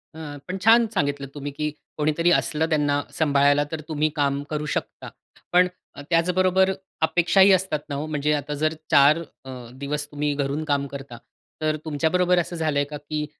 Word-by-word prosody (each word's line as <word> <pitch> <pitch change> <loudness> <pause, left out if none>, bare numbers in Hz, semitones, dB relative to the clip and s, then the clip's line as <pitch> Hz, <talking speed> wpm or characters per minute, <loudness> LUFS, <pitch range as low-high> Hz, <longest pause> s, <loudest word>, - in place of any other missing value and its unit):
हं, 150 -2 -7
पण 185 +1 -3
छान 230 0 +6
सांगितलं 145 -5 -1
तुम्ही, 145 0 -6
की 150 +2 -2 0.3
कोणीतरी 155 +3 +2
असलं 160 -1 +1
त्यांना 145 -2 +1
सांभाळायला 145 -1 +3
तर 160 -1 -4
तुम्ही 155 0 0
काम 140 -1 0
करू 150 -1 -3
शकता. - - -5 0.4
पण 180 +1 +5 0.4
त्याचबरोबर 185 +2 +3 0.3
अपेक्षाही 180 +4 +4
असतात 185 -4 +1
ना 140 - -3
ओ, 150 - -3
म्हणजे 150 -1 0
आता 145 0 -2
जर 155 0 +2 0.2
4 145 +1 +6 0.3
अ, 130 - -9 0.2
दिवस 145 +2 -4
तुम्ही 145 0 -1
घरून 140 +2 -2
काम 140 -1 0
करता, 135 -3 -9 0.4
तर 155 0 +1
तुमच्याबरोबर 175 +4 +2
असं 175 0 -3
झालंय 155 -3 0
का 150 +1 -7
की 150 +1 -4
150 Hz, 165 wpm, -24 LUFS, 145-165 Hz, 0.4 s, छान